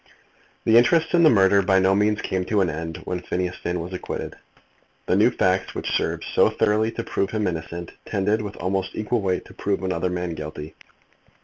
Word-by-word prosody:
The 115 +1 +5
interest 160 +9 +2
in 175 - +5
the 160 - +7
murder 100 -3 +5
by 95 0 +3
no 95 0 +4
means 105 +1 +1
came 95 -1 -1
to 105 +1 +1
an 90 - +1
end 80 +1 -5
when 90 - -3
Phineas 90 0 -3
Finn 90 +1 -3
was 85 +3 -6
acquitted. 90 - -5 0.7
The - - +1
new - - +5
facts 95 0 0
which - - -3
served - - -1
so - - +5
thoroughly 110 +2 +1
to 115 - -4
prove 100 - -1
him 105 +1 -1
innocent 85 -1 -4
tended 105 +3 0
with 105 -1 -6
almost 95 +2 -2
equal 110 +2 -1
weight 95 -2 -1
to - - -14
prove 100 -1 -2
another 90 -1 -1
man 90 -1 -3
guilty. 75 0 -7
95 Hz, 200 wpm, -23 LUFS, 90-105 Hz, 0.7 s, the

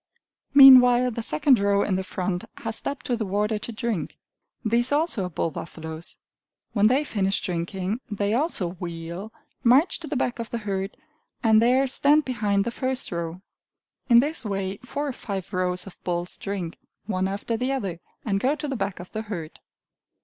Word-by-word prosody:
Meanwhile 250 -2 +9
the 230 - -4
second 225 - +3
row 200 0 +2
in 200 - -1
the 190 +1 0
front 185 -1 -3
has 225 -1 -4
stepped 280 -1 -5
to 245 - 0
the 230 - -2
water 210 +2 0
to 235 - -6
drink. 230 -5 -3 0.5
These 235 +3 +2
also 290 - +1
are - - -4
bull 165 0 -2
buffaloes. 160 0 -8 0.6
When 210 -1 +4
they 260 +6 +3
finish 200 -7 0
drinking, 185 +3 -3
they 205 0 -1
also 245 - 0
wheel, 170 +4 -6 0.3
march 265 +9 +4
to 325 - -8
the 300 - -3
back 250 -2 -1
of 230 - -4
the 235 - -3
herd, 195 -2 -3 0.5
and 220 -1 +5
there 255 +3 +4
stand 290 +3 +3
behind 210 -6 +1
the 235 - -3
first 260 +1 -3
row. 170 +1 -4 0.7
In 235 - +7
this 295 0 -1
way 195 -2 -3
four 280 +6 -4
or 275 - -3
five 195 -6 -6
rows 180 0 -1
of 195 - -13
bulls 175 0 -1
drink, 195 -4 -5 0.3
one 190 -3 -1
after 200 +4 -3
the 250 +4 -1
other, 195 -11 -3 0.3
and 200 -3 +1
go 270 +7 +1
to 300 0 -5
the 275 - -2
back 195 -4 -3
of 180 - -10
the 215 - -3
herd. 180 -8 -7
210 Hz, 185 wpm, -25 LUFS, 185-250 Hz, 0.7 s, Meanwhile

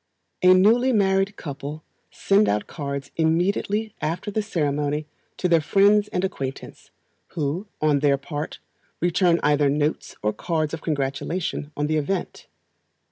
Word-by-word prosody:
A 185 0 +7
newly 230 +7 +4
married 195 -2 +2
couple 145 0 -7 0.3
send 200 +2 +2
out 105 0 0
cards 140 -3 -5
immediately 195 +6 +1
after 170 +6 -2
the 215 - 0
ceremony 150 -6 -1 0.3
to 180 - 0
their 165 -2 +4
friends 205 +6 +4
and 180 - -2
acquaintance, 135 -8 -5 0.5
who, 160 +7 -2
on 150 -2 +2
their 140 -1 +3
part, 145 +2 -5 0.4
return 175 0 +2
either 145 -1 +3
notes 150 +2 -1
or 105 0 +1
cards 160 -3 -2
of 165 - -4
congratulation 145 +2 -2
on 145 - 0
the 155 +1 0
event. 175 +5 -3
160 Hz, 135 wpm, -24 LUFS, 145-190 Hz, 0.5 s, A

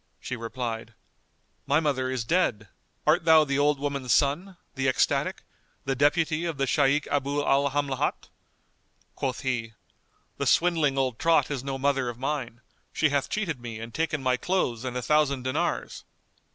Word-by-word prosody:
She 130 - -5
replied, 115 -1 -5 0.7
"My 145 +2 +4
mother 135 -5 0
is 130 -2 -2
dead, 115 - 0 0.4
art - - +3
thou 160 -1 +7
the 140 -1 -1
old 145 0 +2
woman's 140 -3 -2
son, 165 +9 +1 0.2
the 135 0 -1
ecstatic, 130 - +1 0.4
the 135 - 0
deputy 155 +4 +2
of 165 -4 -3
the 135 - +1
Shaykh 140 +1 +2
Abu 145 +1 0
al 140 +1 +3
Hamlat?" 140 -1 -1 0.9
Quoth 130 -1 -3
he, 120 -4 -2 0.7
"The - - 0
swindling 160 -6 +3
old 130 -4 0
trot 165 -2 +3
is 135 -3 -3
no 135 -1 -3
mother 135 -2 +1
of 120 - -7
mine; 130 -3 -3 0.3
she 155 - +2
hath 140 -1 0
cheated 165 - -2
me 115 -2 -6
and 115 0 -8
taken 155 -3 -1
my 130 -1 +2
clothes 125 -11 -1
and 125 -1 -3
a 125 - -3
thousand 145 -3 +2
dinars." 130 0 -2
135 Hz, 165 wpm, -27 LUFS, 125-150 Hz, 0.9 s, thou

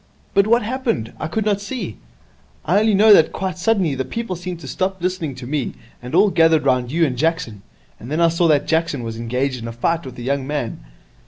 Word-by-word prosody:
'But 200 +1 +4
what 235 +1 +3
happened? 230 - -2
I 155 - -3
could 215 +6 -2
not 205 -1 +1
see. 205 - -5 0.7
I 185 +5 +3
only 215 -1 +3
know 210 +2 +7
that 160 -5 +5
quite 185 -1 -4
suddenly 190 -7 +1
the 130 0 -2
people 190 - -4
seemed 175 0 -6
to 140 - -9
stop 190 +8 -2
listening 175 -6 -2
to 125 -1 -9
me, 140 0 -2 0.3
and 125 +5 -5
all 200 +2 +5
gathered 160 -3 +4
round 125 -2 +1
you 165 +2 +3
and 130 -4 -2
Jackson. 130 - -1 0.4
And 120 - -10
then 155 +3 -1
I 170 -1 +5
saw 170 +1 +2
that 145 -2 +3
Jackson 160 -5 0
was 115 -1 -5
engaged 125 +2 -2
in 115 - -6
a - - -4
fight 165 +9 -1
with 130 -3 -9
a 120 - -7
young 135 +1 -1
man.' 145 -5 -3
160 Hz, 230 wpm, -20 LUFS, 130-190 Hz, 0.7 s, know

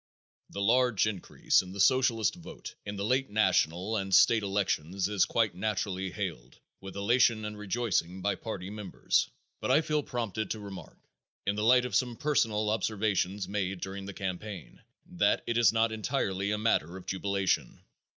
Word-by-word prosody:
The 100 - -4
large 120 -1 +3
increase 105 -4 +1
in 95 0 -10
the 100 - -8
Socialist 115 0 +3
vote 165 -3 -10
in 105 - -4
the 100 0 -3
late 130 +4 +1
national 95 -1 +1
and 95 -2 +1
state 115 +3 +6
elections 95 -2 -1
is 105 -2 +2
quite 115 -5 +1
naturally 95 -1 -2
hailed 85 - -6 0.2
with 95 -1 -9
elation 110 +1 +3
and 105 0 -5
rejoicing 105 -4 -1
by 100 +2 0
party 95 -2 -6
members, 105 -3 0 0.3
but - - -3
I 140 +4 +5
feel 150 -1 0
prompted 115 -6 -3
to 110 - -3
remark, 95 -5 -9 0.5
in 100 - 0
the 105 - -2
light 125 +2 +5
of 125 - -5
some 125 -3 +1
personal 110 -8 +1
observations 105 -3 0
made 95 -2 -2
during 95 +2 -6
the 100 - -6
campaign, 95 - -6 0.2
that - - +1
it 115 - -1
is 120 0 +5
not 115 0 +2
entirely 100 -4 -1
a 105 - 0
matter 95 -5 0
of 95 - -11
jubilation. 95 0 -1
105 Hz, 170 wpm, -30 LUFS, 95-115 Hz, 0.5 s, state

